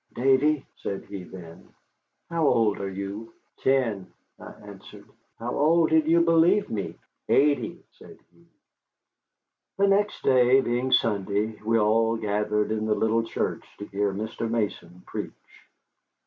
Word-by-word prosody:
"Davy," 135 +3 +2
said 100 - -5
he, 100 -2 -7
then, 85 -2 -13 0.6
"how 165 -3 +1
old 110 -5 +2
are 100 - -3
you?" 100 +4 -7 0.2
"Ten," 115 -9 0 0.3
I - - -10
answered. - - -14 0.3
"How 120 +2 -4
old 160 +2 +3
did 160 -1 +3
you 170 +1 +4
believe 170 +4 +3
me?" 105 -3 -4 0.3
"Eighty," 140 -4 +1
said - - -16 0.2
he. 85 0 -25 1.3
The 200 0 +3
next 205 +1 +1
day, 130 0 +5
being 125 0 -1
Sunday, 105 0 0
we 115 +1 +2
all 115 +1 +2
gathered 105 0 -1
in 110 0 -2
the 105 - +2
little 115 +1 +1
church 115 - -3
to 105 - -7
hear 100 0 -1
Mr. 110 +3 -4
Mason 100 -6 -3
preach. - - -9
115 Hz, 135 wpm, -25 LUFS, 105-135 Hz, 1.3 s, day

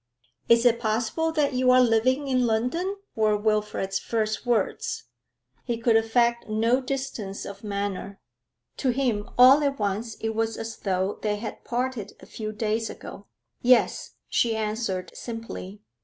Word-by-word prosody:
'Is 235 +1 +5
it 235 -1 +4
possible 235 +8 0
that 295 -3 +1
you 255 0 +2
are 255 0 +7
living 255 +4 +3
in 255 -2 +2
London?' 250 - 0 0.2
were 215 -1 +2
Wilfrid's 210 -2 0
first 220 +1 -2
words. 225 - 0 0.6
He 235 - -2
could 230 0 +2
affect 235 +1 +2
no 230 +4 +2
distance 255 -7 -4
of 200 +1 -9
manner. 200 -1 -4 0.6
To 265 - 0
him 240 -5 0
all 260 +4 +8
at 280 -1 0
once 210 +2 -2
it 225 - -3
was 225 0 -1
as 225 0 -6
though 190 0 -1
they 210 -1 0
had 215 +1 -7
parted 245 -4 -3
a - - -13
few 215 -1 -6
days 220 +1 -1
ago. 200 - -10 0.3
'Yes,' 250 0 +3
she 230 -2 +1
answered 215 -3 -2
simply. 225 -4 -7
225 Hz, 150 wpm, -26 LUFS, 210-250 Hz, 0.6 s, all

